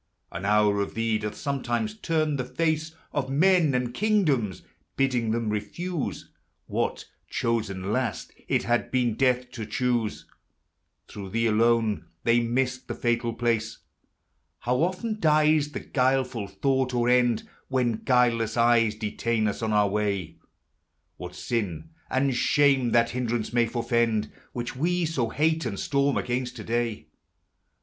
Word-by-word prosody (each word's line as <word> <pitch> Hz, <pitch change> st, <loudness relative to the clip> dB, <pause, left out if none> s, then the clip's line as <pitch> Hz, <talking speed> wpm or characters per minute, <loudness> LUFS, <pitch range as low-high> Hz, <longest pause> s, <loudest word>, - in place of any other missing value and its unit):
An 95 Hz, -, -5 dB
hour 105 Hz, 0 st, +3 dB
of 100 Hz, -, -4 dB
thee 115 Hz, -1 st, +1 dB
doth 105 Hz, -1 st, -4 dB
sometimes 140 Hz, -, -2 dB
turn 155 Hz, -7 st, 0 dB
the 125 Hz, -, -1 dB
face 155 Hz, +4 st, -1 dB, 0.2 s
Of 135 Hz, -2 st, -1 dB
men 160 Hz, 0 st, +4 dB
and 125 Hz, -1 st, -1 dB
kingdoms, 150 Hz, -, +1 dB, 0.3 s
biddingthem 115 Hz, -4 st, +1 dB
refuse 150 Hz, -, -4 dB, 0.3 s
What, -, -, -2 dB, 0.2 s
chosen 105 Hz, -4 st, -1 dB
last, 125 Hz, -6 st, -2 dB
it -, -, +1 dB
had 120 Hz, 0 st, 0 dB
been 125 Hz, -3 st, +1 dB
death 125 Hz, +1 st, +1 dB
to 120 Hz, -3 st, -6 dB
choosei 120 Hz, -1 st, -1 dB, 0.8 s
Through 100 Hz, -2 st, -8 dB
thee 115 Hz, +4 st, 0 dB
alone, 115 Hz, -1 st, +2 dB, 0.2 s
they 115 Hz, +1 st, +4 dB
missed 125 Hz, +2 st, -1 dB
the -, -, -4 dB
fatal 120 Hz, 0 st, 0 dB
place. 115 Hz, -2 st, -1 dB, 0.8 s
How 125 Hz, +1 st, +1 dB
often 190 Hz, -, -1 dB
dies 155 Hz, -2 st, +3 dB
the -, -, -4 dB
guileful 130 Hz, -5 st, 0 dB
thought 130 Hz, +6 st, 0 dB
or 120 Hz, 0 st, +1 dB
end 125 Hz, -2 st, +3 dB, 0.2 s
When 125 Hz, -4 st, +1 dB
guileless 120 Hz, -3 st, +2 dB
eyes 115 Hz, -2 st, +4 dB
detain 110 Hz, +1 st, -1 dB
us 105 Hz, -, -3 dB
on 110 Hz, -1 st, -1 dB
our 105 Hz, -1 st, +4 dB
way 100 Hz, -1 st, 0 dB
I 80 Hz, -, -19 dB, 0.8 s
What 90 Hz, 0 st, -8 dB
sin 115 Hz, -, -3 dB, 0.2 s
and 135 Hz, 0 st, +1 dB
shame 135 Hz, -2 st, +3 dB
that 115 Hz, 0 st, +4 dB
hindrance 120 Hz, -2 st, -2 dB
may 120 Hz, -1 st, +3 dB
forefend, 115 Hz, -2 st, 0 dB, 0.2 s
Which 120 Hz, +1 st, -5 dB
we 175 Hz, +5 st, +1 dB
SO 135 Hz, -8 st, -1 dB
hate 160 Hz, +5 st, +1 dB
and 100 Hz, -4 st, -4 dB
storm 140 Hz, 0 st, +1 dB
against 125 Hz, 0 st, -2 dB
to -, -, -7 dB
day 115 Hz, -1 st, -2 dB
120 Hz, 140 wpm, -26 LUFS, 110-135 Hz, 0.8 s, men